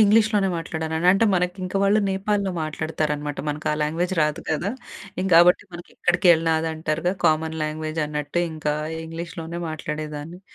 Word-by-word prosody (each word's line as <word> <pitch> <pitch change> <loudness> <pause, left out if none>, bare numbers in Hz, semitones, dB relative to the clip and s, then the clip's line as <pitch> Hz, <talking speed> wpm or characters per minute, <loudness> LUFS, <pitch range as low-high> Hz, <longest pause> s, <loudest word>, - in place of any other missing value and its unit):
ఇంగ్లీష్‍లోనే 210 -1 +4
మాట్లాడాను. 160 -1 -3 0.2
అంటే, 195 +3 +3
మనక 180 +1 -2
వాళ్ళు 200 +2 +4
నేపాల్‍లో 195 +1 0
మాట్లాడతారనమాట. 150 -2 -2
మనకు 150 +1 -4
ఆ - - +1
లాంగ్వేజ్ 170 +5 -1
రాదు 150 +2 -1
గదా! 165 +5 0 0.5
ఇం - - -1
కాబట్టి 175 +3 +7
మనకి 170 0 -10
ఎక్కడికెళ్ళినా 170 -2 +4
అది 160 0 -1
అంటారు 155 0 -2
గదా! 190 - -1
కామన్ 160 0 +1
లాంగ్వేజ్ 155 +1 -3
అన్నట్టే, 150 +3 -2
ఇంకా 150 -1 -1 0.3
ఇంగ్లీష్‌లోనే 165 +1 -6
మాట్లాడేదాన్ని. 155 +2 -5
165 Hz, 140 wpm, -23 LUFS, 155-180 Hz, 0.5 s, కాబట్టి